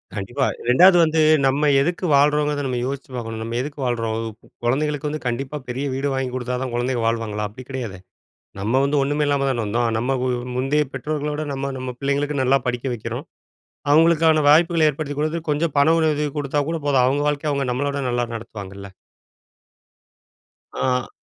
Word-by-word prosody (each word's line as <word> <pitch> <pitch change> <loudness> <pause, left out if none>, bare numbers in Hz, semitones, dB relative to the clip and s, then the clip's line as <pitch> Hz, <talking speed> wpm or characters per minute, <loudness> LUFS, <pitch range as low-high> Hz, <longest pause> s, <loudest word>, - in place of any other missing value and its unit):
கண்டிப்பா. 120 +7 -1 0.2
2வது 175 +8 +7
வந்து, 160 0 +1 0.3
நம்ம 140 +3 +2
எதுக்கு 175 +5 -1
வாழ்றோங்கறத 150 0 +2
நம்ம 125 -1 -2
யோசிச்சு 135 +1 -5
பார்க்கணும். 115 -2 -5
நம்ம 115 +1 -4
எதுக்கு 145 +2 -7
வாழுறோம்? 115 -2 -1 0.5
குழந்தைகளுக்கு 150 +4 0
வந்து 150 -2 -6
கண்டிப்பா 130 +4 -3
பெரிய 130 +3 -3
வீடு 135 +2 -1
வாங்கி 130 -1 -2
குடுத்தா 125 0 -2
தான், 130 -2 -4
குழந்தைகள் 120 -1 -1
வாழ்வாங்களா? 110 -2 -1
அப்படி 125 +5 -11
கிடையாதே. 120 -9 -5 0.6
நம்ம 110 +6 +1
வந்து 140 +1 +1
ஒன்னுமே 145 +2 0
இல்லாம 140 -1 +1
தான 120 -4 0
வந்தோம். 115 +3 0
நம்ம 130 +4 0 0.4
முந்தைய 140 +4 +1
பெற்றோர்களோட, 150 +2 -3
நம்ம 135 0 -3
நம்ம 130 0 -4
பிள்ளைங்களுக்கு 140 +1 0
நல்லா 130 +2 +4
படிக்க 125 +1 -2
வெக்கிறோம். 110 - -6 0.7
அவங்களுக்கான 160 0 +5
வாய்ப்புகள 165 +1 +5
ஏற்படுத்தி 145 0 -5
கொடுத்து, 155 +2 -1
கொஞ்சம் 150 +1 0
பண 140 +2 +5
உதவி 150 -2 +1
குடுத்தா 145 0 0
கூட 165 0 -1
போதும். 135 -3 +3
அவங்க 140 +3 +1
வாழ்க்கைய 150 0 -1
அவங்க 140 -1 -1
நம்மளவிட 140 +2 -2
நல்லா 120 0 0
நடத்துவாங்கள்ல? 100 -3 -8 1.8
அ. 125 -1 -1
135 Hz, 160 wpm, -22 LUFS, 125-150 Hz, 1.8 s, 2வது